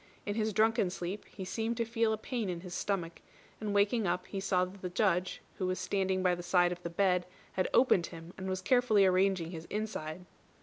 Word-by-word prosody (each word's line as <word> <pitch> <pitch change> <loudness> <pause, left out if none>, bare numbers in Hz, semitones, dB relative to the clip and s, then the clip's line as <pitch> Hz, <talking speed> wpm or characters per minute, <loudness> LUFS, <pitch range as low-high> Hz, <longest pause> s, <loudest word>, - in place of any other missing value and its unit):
In 205 - -1
his 220 0 0
drunken 220 -1 +3
sleep 180 +3 -5
he 190 - -8
seemed 225 +4 -2
to 230 - 0
feel 230 -1 +1
a 220 - 0
pain 225 -2 -3
in 175 -1 -3
his 180 -1 -8
stomach, 175 -5 -2 0.4
and 215 -1 -3
waking 205 +1 +2
up 180 +1 -1
he 195 - -5
saw 185 -1 +2
that 190 +1 -12
the 180 - -3
Judge, 185 -1 0 0.2
who 185 - 0
was 185 0 -1
standing 190 0 0
by 180 -1 +4
the 175 - -3
side 175 0 +3
of 180 0 -5
the 170 - -4
bed, 180 0 +2 0.2
had 185 - 0
opened 195 -9 +4
him, 165 +1 -10
and 190 0 -5
was 185 0 -2
carefully 220 -2 +4
arranging 185 -2 +2
his 165 -2 -7
inside. 180 -6 -4
190 Hz, 220 wpm, -32 LUFS, 180-210 Hz, 0.4 s, by